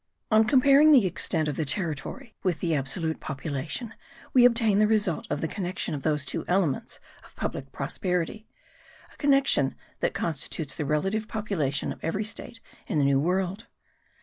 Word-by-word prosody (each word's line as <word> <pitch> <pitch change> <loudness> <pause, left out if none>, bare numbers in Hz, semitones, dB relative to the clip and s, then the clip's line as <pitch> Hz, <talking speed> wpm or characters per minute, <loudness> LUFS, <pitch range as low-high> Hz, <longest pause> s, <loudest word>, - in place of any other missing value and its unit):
On 220 +1 +5
comparing 275 +5 +6
the 260 -9 +7
extent 160 -3 +1
of 150 - -3
the 160 - 0
territory 170 - -2
with 180 -6 0
the 165 -2 0
absolute 155 +3 -1
population, 155 - -4 0.4
we 250 -2 +7
obtain 230 -4 +4
the 215 - +5
result 210 -6 +1
of 145 - -2
the 160 - 0
connection 180 -2 -4
of 145 - -4
those 150 -1 0
two - - -3
elements 175 -7 0 0.2
of - - -19
public 135 0 -4
prosperity, 180 +8 -3 0.7
a - - -22
connection 275 - +3 0.2
that - - -1
constitutes 155 -2 -3
the 150 - -4
relative 195 +9 0
population 190 -12 -2
of - - -18
every 195 +6 -1
state 225 +2 -6 0.3
in - - -1
the 145 - +3
New 140 -1 +3
World. 185 +6 -1
180 Hz, 165 wpm, -27 LUFS, 150-220 Hz, 0.7 s, the